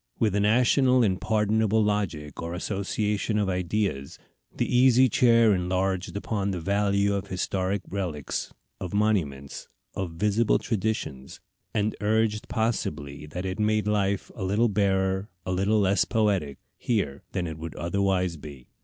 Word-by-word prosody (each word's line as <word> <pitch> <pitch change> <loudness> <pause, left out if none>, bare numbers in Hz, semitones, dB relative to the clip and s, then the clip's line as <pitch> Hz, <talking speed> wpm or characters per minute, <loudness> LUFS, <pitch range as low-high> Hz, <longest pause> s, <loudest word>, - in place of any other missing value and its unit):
With 110 -4 +1
a 105 - +1
national 125 +4 +4
and 95 -4 0
pardonable 110 0 +2
logic, 95 -8 -2
or 85 +1 -4
association 105 +3 -1
of 105 -2 +1
ideas, 90 -6 -2 0.3
the - - -1
Easy 130 +1 +5
Chair 115 -2 +4
enlarged 95 0 -1
upon 100 -1 -2
the 95 -2 -2
value 100 +2 +1
of 100 -1 -3
historical 95 +1 -2
relics, 90 -8 -3 0.3
of 95 +2 -5
monuments, 80 -11 -1 0.3
of 90 -4 -4
visible 105 +6 +2
traditions; 95 - -3 0.3
and 105 0 0
urged 105 0 +1
possibly 75 - -2
that 90 +5 -5
it 95 +1 -3
made 105 -1 +1
life 100 -2 0
a 100 - -6
little 105 +5 +2
barer, 95 -1 +1 0.2
a 90 - -2
little 100 +4 +2
less 100 0 +3
poetic, 100 - 0 0.2
here 95 - -1
than 90 - -1
it 80 -1 -6
would 80 0 -7
otherwise 90 0 0
be. 70 -4 -11
100 Hz, 145 wpm, -26 LUFS, 90-105 Hz, 0.3 s, Easy